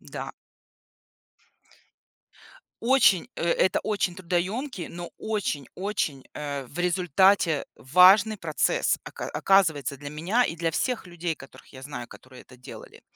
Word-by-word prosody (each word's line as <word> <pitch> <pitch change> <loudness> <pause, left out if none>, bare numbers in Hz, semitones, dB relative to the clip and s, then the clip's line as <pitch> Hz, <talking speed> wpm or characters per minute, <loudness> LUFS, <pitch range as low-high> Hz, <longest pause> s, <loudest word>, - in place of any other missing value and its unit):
Да. - - -7 2.5
Очень, 235 -5 +4
э, - - -4
это 185 +2 +2
очень 200 -4 -1
трудоемкий, 185 - -3
но 175 0 -8
очень-очень, 185 - -3
э, 140 -2 -5
в 140 +7 -12
результате, 180 -2 +2
важный 190 +8 +5
процесс, 170 - +1
ока - - -7
оказывается, 160 -8 +2
для 145 +1 -7
меня 175 +12 0
и 165 - -3
для 165 0 -1
всех 245 +5 -2
людей, 175 -1 -4
которых - - -15
я 130 - -11
знаю, 130 -4 -7
которые 130 0 -14
это 125 - -16
делали. 125 - -12
175 Hz, 125 wpm, -26 LUFS, 145-200 Hz, 2.5 s, важный